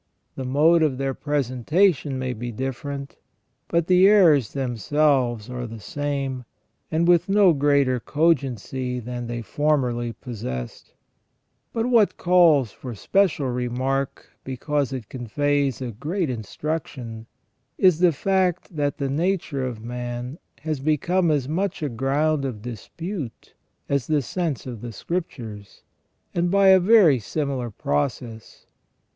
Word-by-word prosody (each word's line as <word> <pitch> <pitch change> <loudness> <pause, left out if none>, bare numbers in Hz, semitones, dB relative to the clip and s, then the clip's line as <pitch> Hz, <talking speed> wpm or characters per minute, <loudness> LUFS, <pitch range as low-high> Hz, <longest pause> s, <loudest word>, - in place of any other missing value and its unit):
The 130 - -5
mode 155 +6 +4
of 150 -5 +1
their 135 0 -1
presentation 145 - +1
may 130 -1 -2
be 120 +1 -5
different, 135 +3 -5 0.5
but 170 -1 +1
the 185 +2 +6
errors 165 - +5
themselves 130 -2 +1
are 125 -1 -5
the 115 0 -9
same, 140 +1 -3 0.5
and 165 +1 +1
with 175 +1 +4
no 195 -3 +5
greater 140 -3 +2
cogency 130 -4 0
than 120 0 -5
they 120 0 -4
formerly 125 -2 0
possessed. 65 - -7 0.8
But 225 0 -1
what 235 -5 +3
calls 165 - +4
for 125 +1 -8
special 170 - +1
remark, 130 +2 -2 0.2
because 135 +2 -2
it 130 -6 -5
conveys 135 +2 -1
a 120 - -4
great 155 - -2
instruction, 120 -1 -5 0.5
is 185 -4 +4
the 180 -1 +5
fact, 180 +2 0
that 145 -1 -1
the 140 -3 -1
nature 160 -1 -1
of 120 -4 -5
man 120 +3 -5 0.2
has 155 -2 -2
become 165 +5 +1
as 145 -4 +1
much 180 +2 -2
a 145 - 0
ground 140 +5 0
of 120 -6 -4
dispute 140 - -7 0.3
as 140 -4 0
the 150 -3 +1
sense 160 - -3
of 120 -5 -7
the 120 -1 -7
Scriptures, 110 - -6 0.5
and 175 0 +1
by 195 +1 +5
a 190 0 +8
very 185 - +5
similar 135 +1 -3
process. 110 - -3
140 Hz, 130 wpm, -23 LUFS, 125-160 Hz, 0.8 s, a